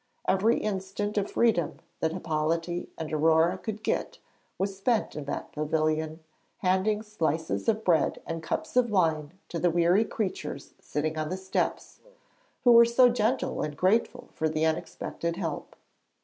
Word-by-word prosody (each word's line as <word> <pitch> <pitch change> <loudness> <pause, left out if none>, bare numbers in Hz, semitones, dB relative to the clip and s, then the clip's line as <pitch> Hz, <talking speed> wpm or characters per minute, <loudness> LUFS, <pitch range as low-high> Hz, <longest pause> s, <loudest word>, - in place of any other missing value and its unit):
Every 205 +5 +3
instant 205 0 -3
of 200 - -3
freedom 220 -9 +1 0.2
that 160 - 0
Hippolyte 165 +1 -2
and 160 -1 -5
Aurore 160 +3 +4
could 215 -1 -5
get - - -1 0.4
was 195 0 -1
spent 220 +3 0
in 150 - -5
that 140 - -5
pavilion, 155 +1 -1 0.4
handing 195 +3 +1
slices 160 -2 -1
of 220 0 0
bread 170 -3 +2
and 165 0 -4
cups 160 - -3
of 250 -2 +4
wine 160 -6 +1 0.2
to 170 - -3
the 175 - +3
weary 175 +5 +3
creatures 180 -10 -4
sitting 155 +2 -2
on 155 0 -2
the 185 - -2
steps, 190 0 -2 0.6
who 245 - +6
were 235 0 +9
so 235 +2 +5
gentle 240 +2 0
and 150 -1 -4
grateful 200 +6 +1
for 160 - 0
the 155 +1 0
unexpected 165 +1 -2
help. 165 -5 -4
175 Hz, 150 wpm, -28 LUFS, 160-210 Hz, 0.6 s, were